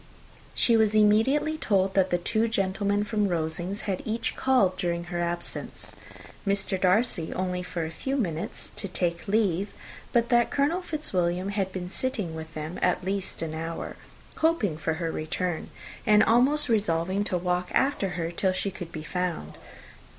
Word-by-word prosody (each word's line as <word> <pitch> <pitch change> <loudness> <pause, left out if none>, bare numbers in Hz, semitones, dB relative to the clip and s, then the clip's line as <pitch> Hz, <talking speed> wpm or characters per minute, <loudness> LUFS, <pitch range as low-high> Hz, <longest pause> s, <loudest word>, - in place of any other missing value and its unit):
She 235 - +4
was 220 -1 +3
immediately 245 +9 +4
told, 195 -2 +2
that 190 -1 +3
the 175 - +2
two 220 +6 +1
gentlemen 200 -1 0
from 210 -1 0
Rosings 170 +3 -2
had 190 -3 -2
each 225 +1 -2
called 245 -9 +3
during 170 -2 -1
her 175 0 -4
absence; 170 0 -3 0.5
Mr. 195 -2 +1
Darcy, 185 -3 +2
only 180 -1 -1
for 175 -2 -3
a 160 - -5
few 270 +11 -2
minutes, 170 - -2
to 200 - 0
take 170 -2 -2
leave, 200 -2 +1 0.4
but 235 -1 +2
that 240 -1 +4
Colonel 295 +6 +1
Fitzwilliam 185 - -1
had 195 -2 -1
been 185 -1 -4
sitting 225 -11 -2
with 160 0 -7
them 155 +3 -5
at 180 0 +2
least 195 -3 -2
an 160 -1 -4
hour, 165 +1 -4 0.4
hoping 315 - +2
for 160 +1 -1
her 165 0 -2
return, 160 +2 -2 0.4
and 210 0 +7
almost 260 +8 +3
resolving 190 -3 +1
to 185 - 0
walk 180 0 -1
after 265 -8 +1
her 165 -1 -2
till 185 +2 +1
she 195 +1 -1
could 175 -2 -8
be 155 - -6
found. 180 +1 -3
190 Hz, 165 wpm, -27 LUFS, 175-220 Hz, 0.5 s, and